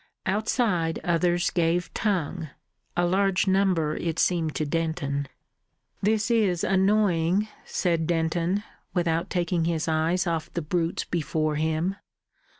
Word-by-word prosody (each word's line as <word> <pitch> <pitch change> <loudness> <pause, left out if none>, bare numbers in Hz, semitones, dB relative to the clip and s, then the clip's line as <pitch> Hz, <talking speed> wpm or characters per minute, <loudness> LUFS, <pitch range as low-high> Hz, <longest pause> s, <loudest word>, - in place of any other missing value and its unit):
Outside 195 -5 +1
others 175 0 +1
gave 175 0 0
tongue 175 -5 -1 0.5
a 175 - +3
large 190 +2 +2
number 185 -5 +2
it 165 -1 -2
seemed 165 -4 +1
to 155 - 0
Denton. 145 -3 -1 0.7
"This 220 +3 +1
is 200 -7 +2
annoying," 190 -1 +2 0.2
said 165 -3 0
Denton, 170 +3 0 0.3
without 170 -2 0
taking 175 -2 0
his 165 -2 -1
eye 160 +2 +1
off 165 -1 -2
the 170 - -1
brutes 165 +2 -1
before 155 -2 -1
him. 160 +5 0
170 Hz, 120 wpm, -26 LUFS, 160-190 Hz, 0.7 s, a